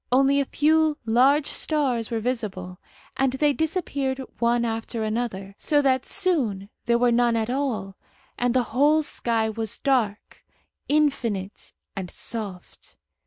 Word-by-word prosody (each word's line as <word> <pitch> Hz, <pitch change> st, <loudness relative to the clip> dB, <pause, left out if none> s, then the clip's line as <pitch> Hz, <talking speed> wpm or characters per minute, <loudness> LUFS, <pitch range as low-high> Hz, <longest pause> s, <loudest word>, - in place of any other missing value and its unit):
Only 275 Hz, +2 st, +4 dB
a 280 Hz, -, +1 dB
few 310 Hz, +2 st, +2 dB
large 265 Hz, +6 st, +4 dB
stars 265 Hz, -10 st, 0 dB
were 230 Hz, -2 st, -1 dB
visible, 205 Hz, -7 st, -4 dB, 0.4 s
and 265 Hz, -1 st, +2 dB
they 290 Hz, +2 st, +2 dB
disappeared 285 Hz, -5 st, -2 dB, 0.2 s
one 235 Hz, 0 st, +2 dB
after 225 Hz, 0 st, -3 dB
another, 215 Hz, -3 st, -3 dB
so 295 Hz, -2 st, +2 dB
that 260 Hz, -1 st, +1 dB
soon 245 Hz, -, 0 dB, 0.2 s
there 235 Hz, 0 st, +4 dB
were 245 Hz, 0 st, +3 dB
none 240 Hz, 0 st, +3 dB
at 225 Hz, +1 st, -1 dB
all, 230 Hz, -8 st, -2 dB, 0.4 s
and 245 Hz, 0 st, 0 dB
the 255 Hz, -, +4 dB
whole 295 Hz, +5 st, +4 dB
sky 230 Hz, -6 st, -1 dB
was 220 Hz, -1 st, -4 dB
dark, 235 Hz, -7 st, -1 dB, 0.5 s
infinite, 235 Hz, -10 st, 0 dB, 0.2 s
and 190 Hz, -3 st, -5 dB
soft. 200 Hz, -5 st, -6 dB
245 Hz, 135 wpm, -24 LUFS, 220-280 Hz, 0.5 s, Only